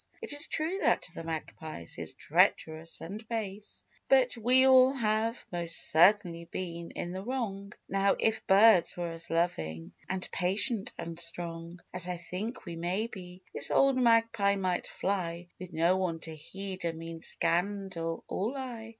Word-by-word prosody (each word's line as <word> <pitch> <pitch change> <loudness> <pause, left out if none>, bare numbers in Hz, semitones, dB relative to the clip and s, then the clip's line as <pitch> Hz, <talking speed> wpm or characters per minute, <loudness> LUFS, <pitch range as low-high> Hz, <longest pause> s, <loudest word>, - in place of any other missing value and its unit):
It - - 0
is 290 - +3
true 330 +5 -1
that - - +2
the - - -7
Magpie 160 - -6
is - - -6
treacherous 160 +1 +1
and 205 +7 -7
base, 210 -3 -5 0.3
But 260 -2 +4
we 250 +3 +4
all 260 0 +7
have, 225 -1 0
most 170 -1 -1
certainly, 170 0 +4
been 170 -1 -5
in 175 - -5
the 185 +1 -5
wrong! 205 -4 -4 0.2
Now, 195 0 +2
if 220 0 0
birds 195 -3 +6
were 175 -1 -3
as 165 0 -8
loving, 80 - -1 0.2
and 190 -1 -2
patient, 195 +4 +2
and 170 0 -6
strong, 170 0 -4
As 180 -1 -3
I 180 -1 -2
think 185 +8 -6
we 170 -2 -6
may 180 +6 -1
be, 185 -4 -10
this - - +1
old 275 -1 +4
Magpie 230 -5 +3
might 185 -2 -1
fly, 175 -3 -3
'With 185 0 -8
no 170 +3 +3
one 180 -3 -1
to 160 - -5
heed 190 +5 -7
a 170 -1 -1
mean 165 0 -7
scandal 170 0 -1
or 215 +7 -2
lie. 245 -5 -6
185 Hz, 160 wpm, -30 LUFS, 170-220 Hz, 0.3 s, all